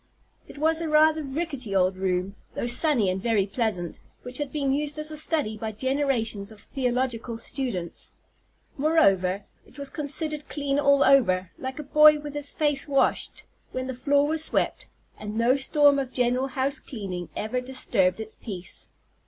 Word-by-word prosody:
It - - -13
was 320 +2 +2
a 325 - -2
rather 310 +1 +4
rickety 275 - -4
old 185 0 +3
room, 185 +1 -2 0.2
though - - -2
sunny 240 -2 +3
and 185 +1 -1
very 215 -3 +2
pleasant, 195 -5 -3 0.2
which 250 +2 -3
had 290 -2 -3
been 280 -3 -1
used 295 +2 0
as 305 0 -1
a - - -5
study 300 -8 0
by 220 0 -5
generations 235 -5 -1
of 215 - -14
theological 245 -2 -2
students. 225 - -5 0.6
Moreover, 200 - +2 0.2
it - - -19
was 280 -1 -2
considered 300 0 -3
clean 285 -1 -1
all 280 -1 +4
over, 185 -9 +3
like 260 0 -5
a 300 - -5
boy 300 +1 +6
with 295 -1 -7
his 290 -1 -1
face 295 -3 0
washed, 275 -1 0 0.3
when 255 0 -3
the 260 - -4
floor 280 +3 +2
was 315 +1 +1
swept; - - -1 0.3
and 210 +1 -6
no 235 +3 +3
storm 285 +1 +4
of 265 -2 -4
general 250 +1 +1
house 270 +2 +1
cleaning 190 - -6
ever 235 +4 -2
disturbed 235 -7 +1
its 220 0 -5
peace. 185 -6 -7
260 Hz, 170 wpm, -26 LUFS, 215-290 Hz, 0.6 s, boy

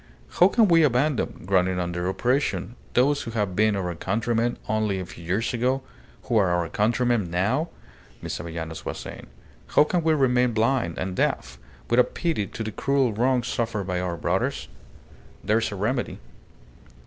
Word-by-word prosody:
"How - - +8
can 225 -3 +4
we 165 -2 +5
abandon, 140 -1 +1
groaning 95 -1 +2
under 90 0 -2
oppression, 120 -2 0 0.2
those 140 +4 +3
who 115 - -6
have 100 -4 -1
been 110 +1 +3
our 90 -3 -2
countrymen 115 +6 -1
only 110 -3 0
a 95 - -4
few 85 - -12
years 95 +9 -1
ago, 130 +3 0 0.4
who 120 -3 +1
are 95 -4 +4
our 85 -1 +1
countrymen 110 0 +1
now?" 110 - 0 0.5
Miss - - -5
Avellanos 80 -1 -6
was - - -4
saying. - - -9 0.5
"How - - +9
can 175 +3 0
we 160 -1 +3
remain 125 -3 +2
blind, 115 -5 +1
and 90 0 -3
deaf 65 -6 -1 0.3
without 120 +1 +2
pity 160 - -1
to 115 - -6
the 110 - -4
cruel 135 +1 +1
wrongs 125 +2 +1
suffered 115 -4 -2
by 90 -1 -1
our 90 -2 -2
brothers? 95 - -1 0.7
There 110 +2 +2
is 115 - -2
a - - -4
remedy." 120 +6 -1
110 Hz, 170 wpm, -25 LUFS, 90-125 Hz, 0.7 s, How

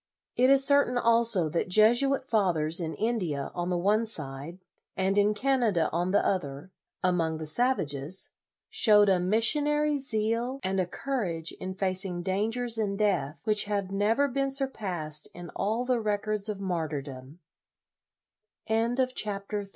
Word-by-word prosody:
It 255 +1 +3
is 275 0 +6
certain 280 -3 +3
also 230 -7 +4
that 170 +3 -2
Jesuit 240 +7 +3
fathers, 175 -8 +1
in 160 -2 -4
India 185 -12 -2
on 175 0 -3
the 180 - 0
one 210 +5 +1
side, 150 -3 -5 0.4
and 190 +1 0
in 205 +1 +2
Canada 235 -8 +1
on 175 +3 -1
the 200 - +2
other, 145 -2 -3 0.3
among 170 -3 0
the 155 - -6
savages, 155 - -2 0.4
showed 210 -2 +5
a 185 -2 +3
missionary 295 - +2
zeal, 235 +1 -2
and 190 0 -1
a 185 - 0
courage 180 -10 -3
in 185 0 -7
facing 185 -2 0
dangers 225 +5 -1
and 200 -2 -1
death, 195 -8 -1
which 215 -2 +2
have 200 -2 -3
never 215 +8 +1
been 275 +1 -1
surpassed 190 - -2
in 175 0 -9
all 225 +5 -2
205 Hz, 125 wpm, -27 LUFS, 175-240 Hz, 0.4 s, is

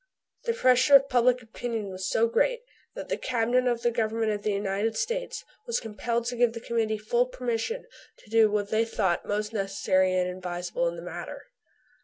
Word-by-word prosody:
The 465 - +1
pressure 255 - +5
of 275 0 +6
public 250 -1 +3
opinion 225 -2 -4
was 185 0 -4
so 225 - +3
great 485 - +1 0.3
that - - -6
the - - -2
Cabinet 250 +1 +1
of 240 -1 0
the 240 - +3
Government 225 -1 0
of 205 -1 -3
the 210 - 0
United 200 +2 -1
States 485 +3 -3 0.2
was 470 - 0
compelled 230 +1 -2
to 245 +1 -2
give 240 -1 +3
the 230 - -6
Committee 225 -2 -1
full 240 +4 +1
permission 250 - -3 0.3
to - - -20
do 225 -1 +5
what 205 -1 -1
they 220 +1 +3
thought 195 -6 -1
most 210 +1 -2
necessary 190 -2 +1
and 180 0 +1
advisable 180 -1 -3
in 170 - -2
the 170 - -8
matter. 180 - -7
225 Hz, 190 wpm, -27 LUFS, 205-245 Hz, 0.3 s, of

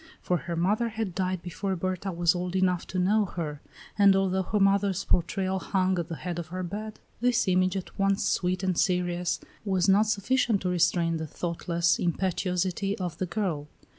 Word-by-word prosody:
For 180 - 0
her 170 0 -5
mother 210 +7 +1
had 220 -4 -3
died 185 -1 -2
before 190 +2 -3
Berta 185 +2 -2
was 170 -1 +2
old 180 0 -3
enough 180 -2 +1
to 185 - -4
know 205 +4 +3
her; 155 -6 -5 0.4
and 200 -1 +7
although 190 -1 +1
her 210 +3 -1
mother's 195 -1 +2
portrait 190 +2 0
hung 185 -1 0
at 170 - -3
the 165 - -5
head 175 +1 -4
of 170 - -5
her 185 +2 -4
bed, 215 +4 -6 0.2
this 245 -2 +2
image, 185 +1 +2
at 190 - -8
once 195 0 +2
sweet 185 0 0
and 185 -1 +1
serious, 180 0 0 0.2
was 190 -3 +1
not 200 +3 +5
sufficient 220 0 +1
to 180 - 0
restrain 170 -1 +2
the 160 0 -4
thoughtless 170 +1 0
impetuosity 185 +2 -1
of 180 -5 -4
the 185 - -1
girl. 170 -7 -2
185 Hz, 185 wpm, -27 LUFS, 175-195 Hz, 0.4 s, and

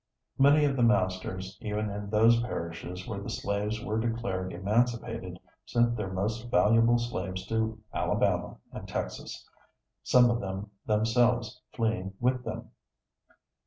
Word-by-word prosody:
Many 145 +2 +6
of 140 -1 +1
the 125 - 0
masters 95 -3 0
even 105 0 -2
in 100 0 -5
those 115 +2 +5
parishes 90 -4 -5
where 100 -2 -4
the - - -6
slaves 105 +2 -2
were 110 +1 0
declared 105 -5 -2
emancipated 110 0 -1 0.3
sent 120 0 +2
their 105 -4 -3
most 110 +5 -2
valuable 115 +1 +5
slaves 95 -6 -3
to 110 +1 -1
Alabama - - 0
and - - -8
Texas, - - -5 0.5
some 125 -1 +5
of 120 - 0
them 95 +1 -5 0.2
themselves 120 +2 +2
fleeing 110 -5 -1
with 125 +1 +1
them. - - -6
110 Hz, 130 wpm, -29 LUFS, 95-120 Hz, 0.5 s, Many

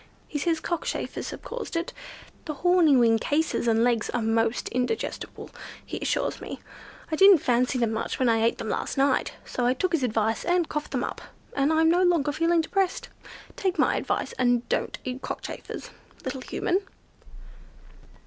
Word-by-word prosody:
He 295 - -3
says 325 +2 +1
cockchafers 345 0 -3
have - - -8
caused 480 -7 -6
it. 335 +1 -2 0.5
The 305 - -4
horny 345 -1 +4
wing 230 -2 +4
cases 295 -1 0
and 225 0 +3
legs 235 -3 +1
are 245 - -1
most 225 +1 +1
indigestible, 250 - -3 0.3
he - - -5
assures - - -1
me. - - -6 0.5
I - - +2
didn't 390 +2 +8
fancy 250 -1 +1
them 235 -3 +1
much 220 - -2
when 255 - +2
I 225 -1 +3
ate 230 +1 +2
them - - -5
last - - -2
night, 275 -1 +2
so 250 - -3
I 250 - +2
took 370 +7 0
his 330 -4 +1
advice 225 -2 0
and 350 -2 +2
coughed 300 0 -3
them - - -1
up, - - -4 0.3
and 280 +2 +2
I'm 320 0 +4
no 350 +2 +3
longer 335 -5 +3
feeling 330 +2 +2
depressed. 380 +3 -1 0.5
Take 380 -1 -1
my - - +3
advice, - - -2
and 245 -1 +2
don't - - -1
eat 255 +1 -5
cockchafers, - - -6 0.3
little 265 - -4
Human." 360 +8 0
280 Hz, 175 wpm, -26 LUFS, 240-335 Hz, 0.5 s, didn't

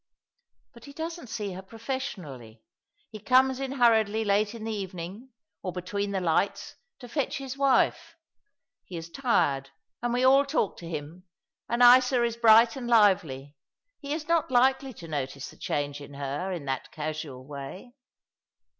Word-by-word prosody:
"But 235 - -14
he 280 - -11
doesn't 330 -1 -6
see 210 -4 -4
her 185 - -7
professionally. 190 - -7 0.5
He 215 - -8
comes 260 +3 +3
in 270 0 -3
hurriedly 225 -4 +3
late 205 +2 +1
in 225 - -8
the 225 - -3
evening 190 +4 -6 0.2
— 160 - -60
or 185 - -4
between 200 +3 -3
the 195 -1 -1
lights— 180 +2 0 0.2
to 245 - -11
fetch 280 +2 -2
his 270 -1 -6
wife. 280 +4 +2 0.7
He 180 - -8
is 165 0 -8
tired, 140 - +1 0.3
and 240 0 -1
we 245 +1 +1
all 270 +2 +6
talk 275 -7 -1
to 170 - -9
him, 165 +4 -7 0.4
and 235 +1 +2
Isa 250 0 +6
is 235 -1 0
bright 230 0 +6
and 255 -3 -5
lively. 185 - +3 0.5
He 280 - -7
is 305 0 -3
not 335 -4 +2
likely 265 +1 +3
to 170 - -10
notice 140 -3 -4
the - - -16
change 145 0 -3
in 145 0 -11
her 145 +7 -3
in 170 -6 -5
that 135 -1 -3
casual 150 -4 -5
way.' 145 - -9
210 Hz, 165 wpm, -27 LUFS, 160-255 Hz, 0.7 s, all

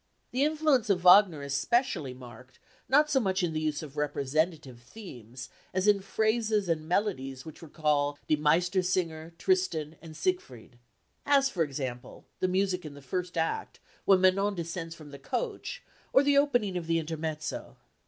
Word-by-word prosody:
The 255 +3 +1
influence 300 -6 +2
of 185 -3 +2
Wagner 180 -4 +6
is 140 -1 -4
specially 165 - 0
marked 125 +1 -13 0.3
not 300 +3 +4
so 270 - +4
much 190 -5 0
in 165 -2 0
the 155 - -2
use 155 0 -2
of 150 -2 -10
representative 145 -1 -1
themes 125 - -10 0.3
as 185 +2 +1
in 205 -1 +5
phrases 215 0 0
and 155 -2 -1
melodies 135 -10 -1
which 160 -1 -11
recall 150 -2 0
Die 155 - +3
Meistersinger, 170 +1 0
Tristan, 165 - 0
and 160 -1 -11
Siegfried. 125 - -3 0.4
As, 275 -1 +3
for 180 - -2
example, 130 -5 -4
the 185 - +1
music 185 0 0
in 150 -2 -9
the 145 - -12
first 180 +6 -4
act, 165 0 -2 0.3
when 190 -2 +5
Manon 195 +2 +3
descends 170 -1 -5
from 155 -3 -13
the 140 - -10
coach, 430 - -4 0.3
or 270 - +5
the 285 0 +3
opening 245 -10 +2
of 170 -2 -5
the 165 0 +2
intermezzo.... 155 -1 -4
170 Hz, 165 wpm, -29 LUFS, 150-205 Hz, 0.4 s, Wagner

